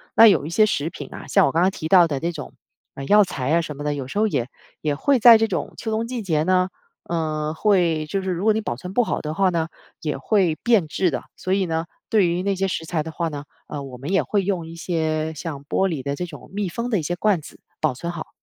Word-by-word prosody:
那 225 Hz, -, +9 dB
有 155 Hz, -9 st, +4 dB
一 -, -, -4 dB
些 215 Hz, +5 st, +4 dB
食 160 Hz, -5 st, -1 dB
品 145 Hz, -, -9 dB
啊， -, -, -9 dB
像 -, -, +4 dB
我 -, -, 0 dB
刚 165 Hz, +4 st, +2 dB
刚 190 Hz, -, +3 dB
提 160 Hz, -, -5 dB
到 175 Hz, -1 st, +6 dB
的 140 Hz, -3 st, -2 dB
那 170 Hz, +3 st, -1 dB
种 150 Hz, -3 st, -8 dB, 0.5 s
药 210 Hz, 0 st, +7 dB
材 135 Hz, -7 st, -3 dB
啊 170 Hz, -, +4 dB
什 150 Hz, -2 st, -6 dB
么 145 Hz, -, -7 dB
的， 145 Hz, -1 st, -1 dB
有 135 Hz, -2 st, -5 dB
时 205 Hz, -, -3 dB
候 220 Hz, -, +3 dB
也 130 Hz, -, -1 dB, 0.3 s
也 150 Hz, -2 st, 0 dB
会 270 Hz, -, +2 dB
在 230 Hz, 0 st, +9 dB
这 225 Hz, -, +2 dB
种 175 Hz, -8 st, -3 dB
秋 225 Hz, -, -4 dB
冬 220 Hz, +1 st, -1 dB
季 240 Hz, -1 st, -4 dB
节 155 Hz, -6 st, 0 dB
呢， 185 Hz, +1 st, +2 dB, 0.4 s
呃， 155 Hz, -2 st, -1 dB
会 170 Hz, -6 st, +2 dB
就 195 Hz, +5 st, -2 dB
是 190 Hz, -, -4 dB
如 175 Hz, +2 st, -3 dB
果 220 Hz, 0 st, +4 dB
你 220 Hz, -, -1 dB
保 180 Hz, -, -3 dB
存 180 Hz, +10 st, -8 dB
不 245 Hz, -, +3 dB
好 -, -, -2 dB
的 150 Hz, 0 st, -4 dB
话 190 Hz, +2 st, +2 dB
呢， 165 Hz, -2 st, -1 dB, 0.3 s
也 155 Hz, -3 st, -2 dB
会 180 Hz, 0 st, +2 dB
变 225 Hz, -9 st, +3 dB
质 180 Hz, +3 st, +1 dB
的。 130 Hz, -, -3 dB
所 185 Hz, -, -2 dB
以 195 Hz, -, +1 dB
呢， 165 Hz, -1 st, -2 dB, 0.2 s
对 210 Hz, -5 st, +3 dB
于 175 Hz, +2 st, -1 dB
那 200 Hz, 0 st, +1 dB
些 195 Hz, +1 st, 0 dB
食 165 Hz, -3 st, -3 dB
材 160 Hz, -1 st, -1 dB
的 160 Hz, +1 st, -6 dB
话 165 Hz, +1 st, -2 dB
呢， 145 Hz, -1 st, -7 dB, 0.2 s
呃， 145 Hz, -2 st, -5 dB
我 130 Hz, -2 st, -9 dB
们 140 Hz, +8 st, -5 dB
也 195 Hz, -, +3 dB
会 200 Hz, -2 st, 0 dB
用 180 Hz, -4 st, -2 dB
一 165 Hz, -, -9 dB
些 160 Hz, -2 st, -1 dB
像 145 Hz, -2 st, -6 dB
玻 190 Hz, +6 st, +1 dB
璃 150 Hz, -7 st, -3 dB
的 140 Hz, 0 st, -2 dB
这 180 Hz, -, -3 dB
种 150 Hz, -5 st, -12 dB
密 200 Hz, -3 st, -2 dB
封 235 Hz, +6 st, -4 dB
的 205 Hz, -, +2 dB
一 -, -, -2 dB
些 175 Hz, +4 st, -2 dB
罐 190 Hz, -3 st, +1 dB
子 -, -, -13 dB, 0.2 s
保 125 Hz, -, +1 dB
存 170 Hz, +6 st, -5 dB
好。 165 Hz, -, -6 dB
170 Hz, 295 characters per minute, -22 LUFS, 155-195 Hz, 0.5 s, 那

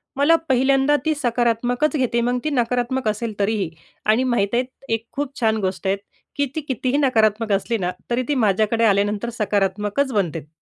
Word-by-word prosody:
मला 290 Hz, +4 st, +4 dB
पहिल्यांदा 270 Hz, +2 st, +3 dB
ती 315 Hz, -, +2 dB
सकारात्मकच 245 Hz, +3 st, 0 dB
घेते, 235 Hz, -2 st, +1 dB
मग 245 Hz, +1 st, 0 dB
ती 305 Hz, -, 0 dB
नकारात्मक 250 Hz, -1 st, 0 dB
असेल 215 Hz, +1 st, -2 dB
तरीही. 200 Hz, -4 st, 0 dB, 0.4 s
आणि 220 Hz, +4 st, +3 dB
माहीत 240 Hz, -6 st, +1 dB
आहे, 245 Hz, +2 st, +2 dB, 0.3 s
एक 225 Hz, +1 st, -2 dB
खूप 280 Hz, -1 st, -4 dB
छान 220 Hz, -1 st, +2 dB
गोष्ट 190 Hz, +1 st, -4 dB
आहे 195 Hz, -, +2 dB, 0.4 s
की 285 Hz, -1 st, +1 dB
ती 315 Hz, -, -1 dB
कितीही 265 Hz, -1 st, -1 dB
नकारात्मक 220 Hz, -5 st, +2 dB
असली 225 Hz, +4 st, 0 dB
ना, 180 Hz, -2 st, -1 dB, 0.2 s
तरी 245 Hz, +2 st, 0 dB
ती 295 Hz, -, 0 dB
माझ्याकडे 220 Hz, 0 st, +2 dB
आल्यानंतर 205 Hz, +2 st, +1 dB
सकारात्मकच 205 Hz, +6 st, 0 dB
बनते. 165 Hz, -7 st, -1 dB
235 Hz, 170 wpm, -21 LUFS, 210-260 Hz, 0.4 s, मला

